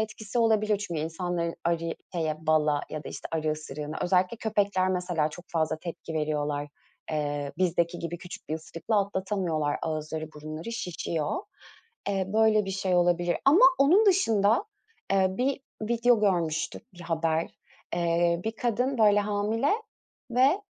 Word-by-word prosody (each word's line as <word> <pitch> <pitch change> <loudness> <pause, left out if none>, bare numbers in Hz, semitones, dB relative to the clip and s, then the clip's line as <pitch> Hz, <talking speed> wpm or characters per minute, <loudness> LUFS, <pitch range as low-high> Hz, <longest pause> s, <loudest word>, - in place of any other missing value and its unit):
etkisi 220 +1 -3
olabilir. 215 -2 +3
Çünkü 170 -6 -3
insanların 170 +1 -2
arı 165 -1 0 0.2
şeye 160 -1 -2
bala 150 -2 +3
ya 155 -1 -5
da - - -6
işte - - -7
arı 155 -1 0
ısırığına. 150 0 -6
Özellikle 185 +4 +2
köpekler 200 -4 +1
mesela 180 -4 0
çok 175 +4 -10
fazla 160 -1 0
tepki 165 -1 -7
veriyorlar. 150 -1 -1 0.4
Eee, 145 -2 -2
bizdeki 175 -1 +1
gibi 170 0 -4
küçük 185 0 -10
bir 155 - -1
ısırıkla 165 +6 -1
atlatamıyorlar. 185 -7 -1
Ağızları, 155 0 -3
burunları 155 +7 -6
şişiyor. 165 -7 -2 0.7
Eee, 195 -1 0
böyle 220 -1 +4
bir 195 - -4
şey 190 -1 0
olabilir 175 0 +2
ama 300 - +6 0.2
onun 355 +11 +5
dışında, 225 - +3 0.5
eee, 190 -1 +4
bir 260 +8 -1 0.2
video 235 0 +3
görmüştük, 170 -3 -1
bir 175 - -13
haber. 165 -1 0 0.5
Eee, 170 0 +2
bir 220 - -1
kadın 245 +2 0
böyle 205 -1 +5
hamile 210 +5 0 0.6
ve 270 - +4
175 Hz, 140 wpm, -28 LUFS, 160-210 Hz, 0.7 s, ama